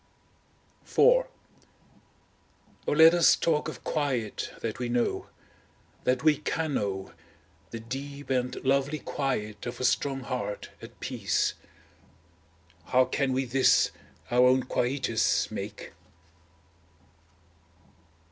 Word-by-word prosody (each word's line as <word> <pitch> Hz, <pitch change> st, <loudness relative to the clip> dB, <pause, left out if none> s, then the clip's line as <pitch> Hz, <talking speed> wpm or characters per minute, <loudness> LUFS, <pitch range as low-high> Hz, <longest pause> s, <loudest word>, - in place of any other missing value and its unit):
IV -, -, -17 dB, 1.9 s
O -, -, +1 dB
let 160 Hz, +2 st, +7 dB
us 175 Hz, -1 st, +6 dB
talk 155 Hz, -3 st, 0 dB
of -, -, -8 dB
quiet 130 Hz, -8 st, -2 dB
that 115 Hz, 0 st, -4 dB
we 125 Hz, -1 st, -2 dB
know, 120 Hz, 0 st, -1 dB, 0.8 s
that 125 Hz, 0 st, +1 dB
we 155 Hz, -2 st, +4 dB
can 155 Hz, 0 st, -2 dB
know, 95 Hz, -4 st, -3 dB, 0.6 s
the 115 Hz, -, -6 dB
deep 140 Hz, +5 st, -7 dB
and 125 Hz, -1 st, 0 dB
lovely 140 Hz, +3 st, +2 dB
quiet 110 Hz, -8 st, -3 dB
of 120 Hz, -, -6 dB
a -, -, -3 dB
strong 135 Hz, +2 st, +1 dB
heart 125 Hz, -5 st, -4 dB
at -, -, -12 dB
peace! -, -, 0 dB, 1.3 s
How 130 Hz, +5 st, +3 dB
can 135 Hz, 0 st, -1 dB
we 130 Hz, +1 st, 0 dB
this, 130 Hz, +2 st, +3 dB, 0.4 s
our 125 Hz, +1 st, +5 dB
own 130 Hz, 0 st, +4 dB
quietus, 125 Hz, -3 st, 0 dB
make? -, -, -6 dB
130 Hz, 110 wpm, -28 LUFS, 120-140 Hz, 1.9 s, let